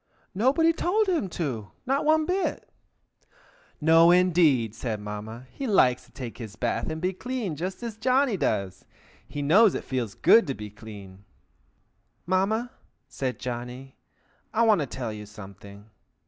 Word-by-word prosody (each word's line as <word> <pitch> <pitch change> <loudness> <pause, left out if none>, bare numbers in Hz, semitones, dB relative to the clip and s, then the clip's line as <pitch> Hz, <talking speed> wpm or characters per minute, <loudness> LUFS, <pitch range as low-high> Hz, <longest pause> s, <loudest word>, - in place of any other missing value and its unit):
Nobody 280 - +3
told 410 +6 +1
him 330 - 0
to, 130 -12 -4 0.2
not 275 +3 0
one 310 0 +3
bit." 370 +3 -2 1.1
"No, 165 +2 +6
indeed!" 165 - +4
said 115 -2 -4
Mamma. 105 +4 -7
"He 275 - -5
likes 125 - +3
to - - -24
take 125 -4 -8
his 110 -3 -8
bath 115 +2 -2
and 160 0 -4
be 185 +3 -1
clean, 230 -4 -4
just 185 +8 -5
as 230 -3 -5
Johnny 255 0 +2
does. 105 - -2 0.4
He 145 - -5
knows 195 +8 +5
it - - -4
feels 120 -6 -3
good 230 - +5
to 135 - -2
be 105 -1 -8
clean." 100 -3 -12 1.0
"Mamma!" 205 +7 0 0.4
said 130 -1 -3
Johnny. 125 +2 -6 0.6
"I 230 - +2
want 215 -7 +4
to 145 - -2
tell 120 -4 -5
you 105 -1 -9
something. 100 0 -13
145 Hz, 150 wpm, -26 LUFS, -, 1.1 s, No